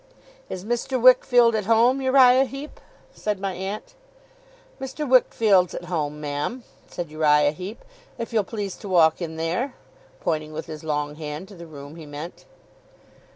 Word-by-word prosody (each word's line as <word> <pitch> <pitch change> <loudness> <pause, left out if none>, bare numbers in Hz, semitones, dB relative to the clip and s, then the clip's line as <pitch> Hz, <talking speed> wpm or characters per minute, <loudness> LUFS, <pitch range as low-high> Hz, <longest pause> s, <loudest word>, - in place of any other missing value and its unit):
'Is 185 +1 -6
Mr. 240 +3 -1
Wickfield 245 -1 +6
at 215 -2 -1
home, 235 +5 +4
Uriah 260 0 +6
Heep?' 275 +3 -9 0.3
said 210 -2 -3
my 195 -1 -2
aunt. 195 - -6 0.9
'Mr. 270 +3 -4
Wickfield's 215 -7 +4
at 175 - -6
home, 150 -4 -3
ma'am,' 150 - -3 0.2
said 170 -4 -6
Uriah 150 -1 +3
Heep, 185 +7 -8 0.3
'if 230 0 -6
you'll 215 -2 +3
please 200 -2 -5
to 205 - -9
walk 165 -2 +4
in 160 -2 -4
there' 175 - -2 0.4
pointing 155 -2 -2
with 160 +1 -5
his 155 -1 -8
long 150 -1 -2
hand 155 +3 -6
to 200 - -12
the 170 -1 -11
room 145 0 -11
he 160 -2 -10
meant. 150 +4 -8
185 Hz, 155 wpm, -24 LUFS, 155-240 Hz, 0.9 s, Wickfield